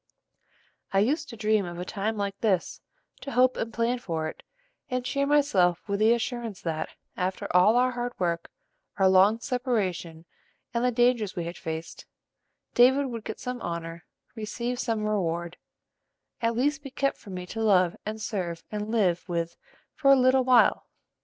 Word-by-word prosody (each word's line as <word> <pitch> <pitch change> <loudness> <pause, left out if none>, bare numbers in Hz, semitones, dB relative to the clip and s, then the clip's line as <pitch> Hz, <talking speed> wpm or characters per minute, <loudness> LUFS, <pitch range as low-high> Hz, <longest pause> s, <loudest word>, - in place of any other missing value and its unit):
"I 195 - +1
used 280 +8 +1
to 230 - -9
dream 215 -1 +2
of 175 -1 -6
a 180 - -4
time 210 +4 -2
like 200 -1 -2
this, 195 -6 0 0.4
to 275 - -7
hope 255 +1 +4
and 230 - -3
plan 235 +2 0
for 165 -8 -3
it, - - -8 0.5
and 250 -1 -2
cheer 280 +2 0
myself 195 - +2
with 200 0 -1
the 220 +1 +5
assurance 235 -4 -4
that, 160 -2 -3 0.3
after 185 +1 -2
all 185 +5 +6
our 250 +1 +3
hard 245 0 -3
work, 170 -2 -1 0.5
our 190 - +4
long 190 +4 +5
separation, 190 -11 -2 0.5
and 235 0 0
the 250 - +4
dangers 240 -4 +2
we 175 - -2
had 170 +1 -5
faced, 160 0 -6 0.7
David 265 +3 +5
would 230 -2 -5
get 220 - -6
some 250 -1 -5
honor, 170 -1 -5 0.3
receive 235 +2 -4
some 225 -4 -1
reward, 170 -4 -1 0.8
at 230 0 +1
least 285 +4 +1
be 280 - -8
kept 275 +1 -1
for - - -13
me 180 -1 -5
to 225 +5 -5
love 185 -5 +3
and 215 +1 -5
serve 180 -6 -3
and 210 0 -4
live 190 -6 +1
with 170 0 -2 0.4
for 275 -3 +3
a - - +9
little 255 +1 +4
while. 250 -1 +4
215 Hz, 170 wpm, -27 LUFS, 180-245 Hz, 0.8 s, a